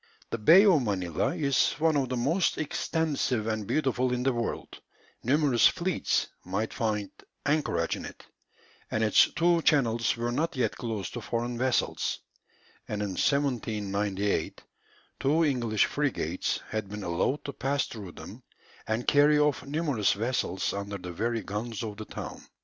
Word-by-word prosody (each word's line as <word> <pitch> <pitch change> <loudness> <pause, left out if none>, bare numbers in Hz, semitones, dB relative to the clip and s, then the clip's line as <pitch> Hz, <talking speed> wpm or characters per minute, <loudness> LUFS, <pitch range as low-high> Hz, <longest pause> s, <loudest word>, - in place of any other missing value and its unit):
The 115 - -2
Bay 170 - +7
of 180 -8 +5
Manilla 95 -8 -1
is 140 -3 +2
one 160 +1 +1
of 135 -3 +1
the 125 - -1
most 165 +10 +1
extensive 150 -6 -1
and 110 -2 -2
beautiful 130 -4 +1
in 125 0 -1
the 135 0 +2
world; 120 -1 -4 0.4
numerous 135 -2 +4
fleets 175 -1 0 0.2
might 100 +5 -2
find 105 -3 -1 0.3
anchorage 150 +1 +1
in - - -7
it; - - -11 0.6
and 110 - 0
its 110 - +5
two 170 0 +3
channels 120 -8 +2
were 120 +1 -1
not 150 +6 -1
yet 130 - 0
closed 110 -5 -4
to 120 - -5
foreign 120 +2 -2
vessels, 125 +1 0 0.7
and 105 -1 -2
in 100 - -2
1798 105 -5 -1 0.6
two 155 +4 +3
English 120 -7 +2
frigates 125 - -1
had 110 -3 -3
been 105 0 -6
allowed 90 - -1
to 140 - -4
pass 140 +4 0
through 100 -6 -8
them - - -10 0.5
and 110 +2 -2
carry 150 +1 +5
off 150 -3 +2
numerous 145 -8 +1
vessels 105 -4 -1
under 100 0 -4
the 90 -1 -7
very 115 +4 -1
guns 110 +3 -4
of 105 -2 -5
the 110 - -6
town. - - -7
120 Hz, 155 wpm, -28 LUFS, 105-145 Hz, 0.7 s, Bay